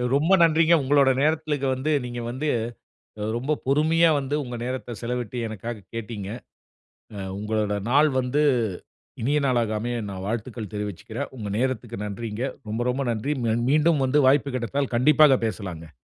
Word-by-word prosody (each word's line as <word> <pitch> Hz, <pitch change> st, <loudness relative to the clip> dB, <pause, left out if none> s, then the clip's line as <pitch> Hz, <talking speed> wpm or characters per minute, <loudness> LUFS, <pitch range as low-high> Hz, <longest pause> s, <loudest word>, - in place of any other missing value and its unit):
ரொம்ப 155 Hz, +6 st, +2 dB
நன்றிங்க. 165 Hz, +1 st, +4 dB
உங்களோட 140 Hz, 0 st, +4 dB
நேரத்துல 155 Hz, 0 st, +1 dB
இங்க 135 Hz, -, -2 dB
வந்து 135 Hz, +4 st, -1 dB
நீங்க 120 Hz, 0 st, -5 dB
வந்து 140 Hz, +5 st, -3 dB, 0.7 s
அ -, -, -2 dB
ரொம்ப 135 Hz, +5 st, -1 dB
பொறுமையா 160 Hz, +4 st, +4 dB
வந்து, 140 Hz, +2 st, -2 dB
உங்க 120 Hz, -1 st, -6 dB
நேரத்த 125 Hz, -2 st, -4 dB
செலவிட்டு 125 Hz, 0 st, -3 dB
எனக்காக 110 Hz, 0 st, -6 dB
கேட்டீங்க. 105 Hz, -3 st, -5 dB, 0.9 s
அ -, -, -6 dB, 0.2 s
உங்களோட 105 Hz, 0 st, -1 dB, 0.2 s
நாள் 145 Hz, +3 st, +5 dB
வந்து, 130 Hz, +4 st, 0 dB, 0.8 s
இனிய 140 Hz, +6 st, +1 dB
நாளாக 120 Hz, -4 st, +1 dB
அமைய, 120 Hz, +2 st, -2 dB
நான் 95 Hz, 0 st, -6 dB
வாழ்த்துக்கள் 110 Hz, -1 st, -4 dB
தெரிவிச்சுக்குறேன். 105 Hz, -3 st, -5 dB
உங்க 105 Hz, -3 st, -5 dB
நேரத்துக்கு 120 Hz, -3 st, -2 dB
நன்றிங்க. 105 Hz, +2 st, -5 dB, 0.3 s
ரொம்ப, 110 Hz, +2 st, -2 dB
ரொம்ப 135 Hz, +2 st, -1 dB
நன்றி! 115 Hz, +7 st, -1 dB
ம்ம 115 Hz, -1 st, +1 dB
மீண்டும் 155 Hz, -1 st, +3 dB
வந்து 145 Hz, +3 st, +3 dB
வாய்ப்பு 140 Hz, 0 st, +3 dB
கிடைத்தால் 130 Hz, +1 st, -2 dB
கண்டிப்பாக 150 Hz, +1 st, +6 dB
பேசலாங்க. 85 Hz, -, -6 dB
125 Hz, 150 wpm, -25 LUFS, 110-145 Hz, 0.9 s, கண்டிப்பாக